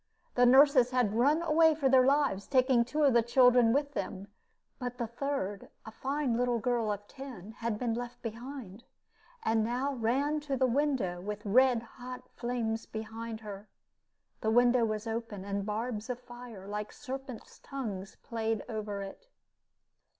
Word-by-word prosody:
The 245 Hz, 0 st, +5 dB
nurses 265 Hz, -1 st, +6 dB
had 250 Hz, -5 st, +1 dB
run 285 Hz, +8 st, +3 dB
away 320 Hz, -1 st, +5 dB
for 290 Hz, -3 st, +1 dB
their 260 Hz, -1 st, +6 dB
lives, 275 Hz, -9 st, +2 dB
taking 255 Hz, -2 st, +4 dB
two 300 Hz, +6 st, -1 dB
of 275 Hz, -3 st, +5 dB
the 235 Hz, -, +6 dB
children 245 Hz, 0 st, +5 dB
with 285 Hz, +2 st, 0 dB
them; 200 Hz, -6 st, -4 dB, 0.5 s
but 250 Hz, -1 st, -4 dB
the 240 Hz, -, -1 dB
third, 235 Hz, -4 st, -3 dB, 0.2 s
a 220 Hz, -, -8 dB
fine 270 Hz, +1 st, -1 dB
little 245 Hz, 0 st, +1 dB
girl 230 Hz, -2 st, 0 dB
of 205 Hz, 0 st, -5 dB
ten, 250 Hz, -7 st, -9 dB
had 230 Hz, -2 st, -1 dB
been 235 Hz, 0 st, -1 dB
left 240 Hz, +1 st, -5 dB
behind, 235 Hz, -2 st, -7 dB, 0.6 s
and 225 Hz, -1 st, +2 dB
now 250 Hz, +5 st, -1 dB
ran 270 Hz, +5 st, +1 dB
to 285 Hz, -2 st, -3 dB
the 260 Hz, -, +3 dB
window 255 Hz, -9 st, 0 dB
with 210 Hz, +2 st, -5 dB
red 245 Hz, +2 st, +4 dB
hot 250 Hz, +1 st, -9 dB
flames 235 Hz, -2 st, -2 dB
behind 225 Hz, +1 st, -6 dB
her. 205 Hz, -1 st, -8 dB, 0.7 s
The 220 Hz, -, 0 dB
window 245 Hz, +1 st, +4 dB
was 215 Hz, 0 st, -2 dB
open, 225 Hz, -4 st, -4 dB
and 200 Hz, 0 st, -3 dB
barbs 220 Hz, +1 st, -3 dB
of 250 Hz, -1 st, -3 dB
fire, 240 Hz, -5 st, -11 dB
like 210 Hz, +1 st, -4 dB
serpents' 270 Hz, -3 st, -8 dB
tongues, 205 Hz, -9 st, -6 dB
played 225 Hz, -2 st, -2 dB
over 210 Hz, -3 st, -4 dB
it. 195 Hz, -, -10 dB
240 Hz, 160 wpm, -31 LUFS, 220-265 Hz, 0.7 s, nurses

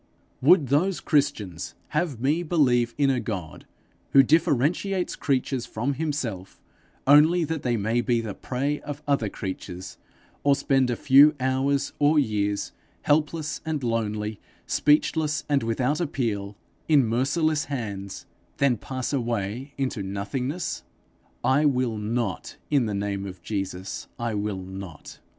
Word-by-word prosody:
Would 150 Hz, -1 st, +5 dB
those 175 Hz, +7 st, +2 dB
Christians 135 Hz, -, -1 dB
have 150 Hz, -5 st, -1 dB
me 145 Hz, +7 st, +1 dB
believe 125 Hz, -9 st, +2 dB
in 140 Hz, -2 st, +3 dB
a 130 Hz, -, 0 dB
God 95 Hz, -9 st, -6 dB, 0.5 s
who 135 Hz, -, +8 dB
differentiates 160 Hz, +6 st, +1 dB
creatures 130 Hz, -2 st, -1 dB
from 125 Hz, +6 st, -2 dB
himself, 130 Hz, -, -4 dB, 0.5 s
only 155 Hz, +5 st, +6 dB
that 160 Hz, -1 st, -2 dB
they 120 Hz, -2 st, 0 dB
may 110 Hz, +4 st, +1 dB
be 120 Hz, 0 st, +1 dB
the 110 Hz, -3 st, -4 dB
prey 140 Hz, +7 st, -2 dB
of 145 Hz, 0 st, -7 dB
other 140 Hz, -7 st, +1 dB
creatures, 95 Hz, -2 st, -7 dB, 0.4 s
or 140 Hz, -1 st, +5 dB
spend 135 Hz, -2 st, +2 dB
a 120 Hz, -, 0 dB
few 145 Hz, +5 st, +6 dB
hours 135 Hz, +2 st, 0 dB
or 150 Hz, +2 st, +4 dB
years, 105 Hz, -6 st, 0 dB, 0.3 s
helpless 150 Hz, 0 st, 0 dB
and 155 Hz, -4 st, -3 dB
lonely, 110 Hz, -2 st, -2 dB, 0.3 s
speechless 150 Hz, 0 st, +2 dB
and 145 Hz, -2 st, +2 dB
without 125 Hz, +7 st, 0 dB
appeal, 105 Hz, -, -2 dB, 0.3 s
in 145 Hz, -5 st, +5 dB
merciless 145 Hz, +7 st, +1 dB
hands, 100 Hz, -8 st, -5 dB, 0.3 s
then 140 Hz, -4 st, +3 dB
pass 130 Hz, +5 st, -4 dB
away 120 Hz, +1 st, -2 dB
into 130 Hz, -5 st, -2 dB
nothingness? 105 Hz, -, -3 dB, 0.6 s
I 140 Hz, +3 st, +3 dB
will 125 Hz, -6 st, +1 dB
not; 110 Hz, -3 st, -3 dB
in 135 Hz, -6 st, +3 dB
the 105 Hz, -, -2 dB
name 100 Hz, -1 st, -2 dB
of 90 Hz, -2 st, -10 dB
Jesus, 95 Hz, -2 st, -4 dB
I 120 Hz, -1 st, -2 dB
will 105 Hz, -1 st, -2 dB
not. 95 Hz, -4 st, -9 dB
130 Hz, 135 wpm, -25 LUFS, 105-145 Hz, 0.6 s, who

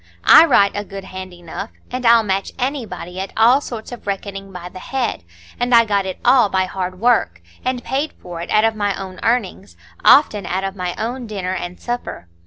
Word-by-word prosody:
"I 330 Hz, -, +9 dB
write 200 Hz, -10 st, +4 dB
a 205 Hz, -, -3 dB
good 195 Hz, -1 st, -8 dB
hand 185 Hz, 0 st, -8 dB
enough, 175 Hz, +4 st, -8 dB, 0.2 s
and 250 Hz, -1 st, -1 dB
I'll 230 Hz, -1 st, +6 dB
match 195 Hz, -1 st, -2 dB
anybody 240 Hz, -9 st, -4 dB
at 190 Hz, 0 st, -4 dB
all 240 Hz, +5 st, +5 dB
sorts 235 Hz, -5 st, -7 dB
of 240 Hz, -4 st, -10 dB
reckoning 195 Hz, 0 st, -5 dB
by 180 Hz, -1 st, -8 dB
the 185 Hz, +1 st, -10 dB
head; 245 Hz, -, -3 dB, 0.4 s
and 245 Hz, 0 st, +3 dB
I 230 Hz, 0 st, +6 dB
got 200 Hz, -2 st, 0 dB
it 185 Hz, -, -4 dB
all 245 Hz, -4 st, +5 dB
by 190 Hz, -1 st, +1 dB
hard 185 Hz, -1 st, -5 dB
work, 225 Hz, -, +2 dB, 0.2 s
and 255 Hz, -1 st, -2 dB
paid 280 Hz, +4 st, -2 dB
for 175 Hz, -2 st, -9 dB
it 170 Hz, -, -7 dB
out 215 Hz, -, +3 dB
of 225 Hz, 0 st, +2 dB
my 205 Hz, -2 st, -1 dB
own 190 Hz, -1 st, -8 dB
earnings,—often 210 Hz, 0 st, +2 dB
out 190 Hz, +2 st, -2 dB
of 195 Hz, 0 st, -3 dB
my 180 Hz, -2 st, -3 dB
own 240 Hz, +2 st, -4 dB
dinner 190 Hz, -3 st, -3 dB
and 180 Hz, -1 st, -5 dB
supper. 240 Hz, -, -5 dB
200 Hz, 200 wpm, -19 LUFS, 185-240 Hz, 0.4 s, I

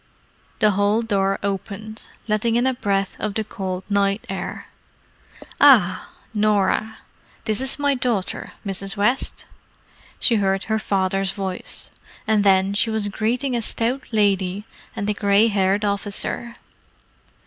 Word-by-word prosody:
The 215 Hz, -, +4 dB
hall 205 Hz, +3 st, +2 dB
door 195 Hz, -3 st, +1 dB
opened, 200 Hz, +2 st, -5 dB, 0.2 s
letting 215 Hz, +2 st, +1 dB
in 240 Hz, +1 st, +2 dB
a 260 Hz, -, +2 dB
breath 200 Hz, -5 st, -1 dB
of 210 Hz, -1 st, -3 dB
the 220 Hz, -, 0 dB
cold 190 Hz, -3 st, -5 dB
night 200 Hz, +1 st, +1 dB
air. 195 Hz, -, -5 dB, 0.9 s
"Ah, 210 Hz, -11 st, +5 dB, 0.2 s
Norah—this 215 Hz, +1 st, -1 dB
is 265 Hz, 0 st, -2 dB
my 285 Hz, -1 st, +2 dB
daughter, 235 Hz, -7 st, -2 dB
Mrs. 195 Hz, +1 st, -1 dB
West," 235 Hz, +6 st, 0 dB, 0.7 s
she 235 Hz, -, +3 dB
heard 195 Hz, -1 st, +1 dB
her 220 Hz, 0 st, -1 dB
father's 195 Hz, -1 st, 0 dB
voice; 190 Hz, -2 st, -6 dB, 0.3 s
and 215 Hz, -1 st, +2 dB
then 195 Hz, 0 st, +4 dB
she 215 Hz, +3 st, +1 dB
was 220 Hz, -2 st, -1 dB
greeting 240 Hz, +6 st, -1 dB
a 235 Hz, -, 0 dB
stout 235 Hz, +4 st, 0 dB
lady 200 Hz, -2 st, +1 dB, 0.3 s
and 200 Hz, -, -3 dB
a 210 Hz, -, +1 dB
grey 205 Hz, +2 st, +3 dB
haired 200 Hz, 0 st, +1 dB
officer. 205 Hz, +3 st, -2 dB
205 Hz, 130 wpm, -22 LUFS, 195-220 Hz, 0.9 s, Ah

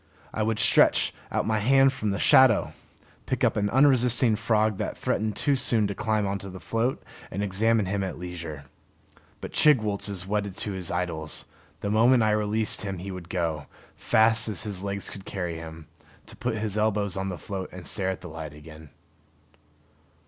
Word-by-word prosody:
I 110 Hz, -, -2 dB
would 110 Hz, 0 st, 0 dB
stretch -, -, +4 dB, 0.2 s
out -, -, -1 dB
my 110 Hz, -1 st, 0 dB
hand 135 Hz, +4 st, +4 dB
from 110 Hz, -4 st, -3 dB
the 100 Hz, -, -1 dB
shadow, 130 Hz, 0 st, +5 dB, 0.5 s
pick -, -, -2 dB
up -, -, +3 dB
an 105 Hz, -1 st, 0 dB
unresisting 125 Hz, -2 st, +4 dB
frog 110 Hz, -1 st, +1 dB
that -, -, -3 dB
threatened 110 Hz, -1 st, -1 dB
too 145 Hz, +4 st, +1 dB
soon 115 Hz, -4 st, +2 dB
to 100 Hz, -, -2 dB
climb 105 Hz, 0 st, -1 dB
onto 100 Hz, 0 st, -4 dB
the 95 Hz, 0 st, -9 dB
float, 115 Hz, +6 st, -2 dB, 0.3 s
and 100 Hz, +3 st, -3 dB
examine 105 Hz, +2 st, +1 dB
him 100 Hz, +1 st, -2 dB
at 95 Hz, -, -5 dB
leisure. 85 Hz, -5 st, -7 dB, 0.8 s
But -, -, -7 dB
Chigwooltz 110 Hz, -9 st, +3 dB
is 95 Hz, -3 st, -5 dB
wedded 100 Hz, -1 st, -2 dB
to 105 Hz, -, -2 dB
his 95 Hz, -3 st, -4 dB
idols; 85 Hz, -3 st, -3 dB, 0.4 s
the 100 Hz, -, -2 dB
moment 115 Hz, +3 st, +4 dB
I 110 Hz, -, +2 dB
released 105 Hz, +1 st, 0 dB
him 100 Hz, -2 st, -4 dB
he 95 Hz, +3 st, -7 dB
would 90 Hz, -2 st, -9 dB
go, 80 Hz, -5 st, -2 dB, 0.3 s
fast 110 Hz, +1 st, +3 dB
as 105 Hz, -, +1 dB
his 100 Hz, -4 st, -5 dB
legs 100 Hz, 0 st, -4 dB
could 95 Hz, -, -8 dB
carry 90 Hz, -4 st, -4 dB
him, 80 Hz, -1 st, -9 dB, 0.4 s
to -, -, -13 dB
put 120 Hz, -2 st, -3 dB
his 105 Hz, -1 st, -2 dB
elbows 105 Hz, -3 st, 0 dB
on 95 Hz, 0 st, -3 dB
the 90 Hz, -, -5 dB
float 95 Hz, +3 st, -6 dB
and 90 Hz, -1 st, -10 dB
stare 95 Hz, -2 st, -1 dB
at 95 Hz, -1 st, -4 dB
the 90 Hz, -, -8 dB
light 80 Hz, -2 st, -8 dB
again. 75 Hz, 0 st, -13 dB
100 Hz, 185 wpm, -26 LUFS, 90-110 Hz, 0.8 s, shadow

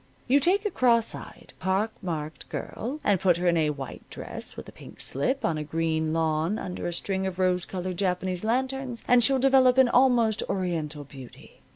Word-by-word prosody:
You 270 Hz, +3 st, +5 dB
take 380 Hz, +8 st, +2 dB
a 420 Hz, -, 0 dB
cross 235 Hz, -6 st, +3 dB
eyed, -, -, -11 dB
pock 195 Hz, +4 st, 0 dB
marked 155 Hz, -4 st, -5 dB
girl 260 Hz, +7 st, -5 dB
and 200 Hz, -3 st, +3 dB
put 180 Hz, -2 st, +3 dB
her 180 Hz, +1 st, -1 dB
in 170 Hz, -, +4 dB
a 155 Hz, -2 st, +2 dB
white 140 Hz, -3 st, -6 dB
dress, -, -, -6 dB
with -, -, -8 dB
a -, -, -10 dB
pink -, -, -14 dB
slip, 260 Hz, -, -1 dB
on 160 Hz, -2 st, 0 dB
a -, -, -3 dB
green 160 Hz, 0 st, -1 dB
lawn 160 Hz, +4 st, 0 dB
under 180 Hz, -4 st, -5 dB
a -, -, -2 dB
string 190 Hz, +2 st, -2 dB
of 185 Hz, -1 st, -5 dB
rose 180 Hz, -1 st, +1 dB
colored 185 Hz, -1 st, -4 dB
Japanese 185 Hz, -1 st, -1 dB
lanterns, 260 Hz, +1 st, -1 dB
and 245 Hz, -1 st, +5 dB
she'll 270 Hz, +2 st, +4 dB
develop 260 Hz, -1 st, +4 dB
an 260 Hz, -2 st, +6 dB
almost 235 Hz, -4 st, +3 dB
Oriental 160 Hz, -6 st, -2 dB
beauty. 135 Hz, -3 st, -14 dB
190 Hz, 195 wpm, -26 LUFS, 165-245 Hz, -, an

